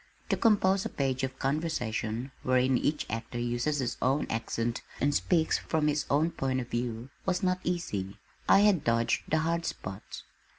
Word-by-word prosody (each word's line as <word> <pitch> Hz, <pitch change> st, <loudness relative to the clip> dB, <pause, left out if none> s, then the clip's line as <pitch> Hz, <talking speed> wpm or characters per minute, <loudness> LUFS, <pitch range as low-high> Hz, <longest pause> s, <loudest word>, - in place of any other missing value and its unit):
To -, -, +3 dB
compose 195 Hz, -3 st, +3 dB
a -, -, -3 dB
page 135 Hz, -2 st, -1 dB
of 130 Hz, 0 st, -3 dB
conversation, 130 Hz, -5 st, -2 dB
wherein 130 Hz, 0 st, +3 dB
each 150 Hz, +4 st, 0 dB
actor 115 Hz, +2 st, -4 dB
uses 120 Hz, +5 st, 0 dB
his 125 Hz, -3 st, -2 dB
own 135 Hz, +3 st, +2 dB
accent 115 Hz, +1 st, -2 dB, 0.2 s
and 145 Hz, +2 st, +2 dB
speaks 160 Hz, +2 st, +2 dB
from 155 Hz, -1 st, 0 dB
his 150 Hz, 0 st, 0 dB
own 155 Hz, +4 st, +3 dB
point 130 Hz, -3 st, -1 dB
of 125 Hz, -1 st, -5 dB
view, 120 Hz, +1 st, -3 dB, 0.2 s
was 185 Hz, +1 st, +1 dB
not 185 Hz, 0 st, +2 dB
easy. 105 Hz, -, -2 dB, 0.3 s
I 195 Hz, -, +7 dB
had 205 Hz, -7 st, +4 dB
dodged 115 Hz, 0 st, +2 dB
the 160 Hz, -, +3 dB
hard 165 Hz, +1 st, 0 dB
spots. 95 Hz, -10 st, -6 dB
135 Hz, 170 wpm, -29 LUFS, 120-160 Hz, 0.3 s, I